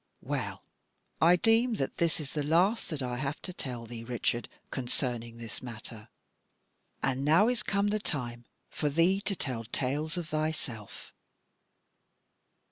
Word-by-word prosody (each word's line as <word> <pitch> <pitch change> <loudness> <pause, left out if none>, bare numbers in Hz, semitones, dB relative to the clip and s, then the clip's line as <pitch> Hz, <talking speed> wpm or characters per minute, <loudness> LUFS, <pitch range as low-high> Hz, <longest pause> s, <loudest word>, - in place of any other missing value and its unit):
Well, - - -2 0.6
I 170 +2 +8
deem 225 +5 +4
that 135 - -2
this 170 0 +2
is 140 -4 -5
the 150 - 0
last 175 +10 +3
that 150 -5 -3
I 125 -1 -2
have 140 +3 -2
to 180 - -4
tell 125 -8 -4
thee, 115 0 -7
Richard, 120 0 0 0.2
concerning 120 -2 -2
this 115 -2 -6
matter: 115 -2 -8 0.9
and 135 0 +1
now 160 +9 +6
is 245 -3 +2
come 200 0 +2
the 215 +1 +1
time 120 - -3 0.3
for 150 - 0
thee 170 +6 +4
to 200 0 0
tell 125 -8 -2
tales 145 +8 -1
of 170 -3 -3
thyself.' 155 -9 -3
145 Hz, 145 wpm, -31 LUFS, 120-175 Hz, 0.9 s, I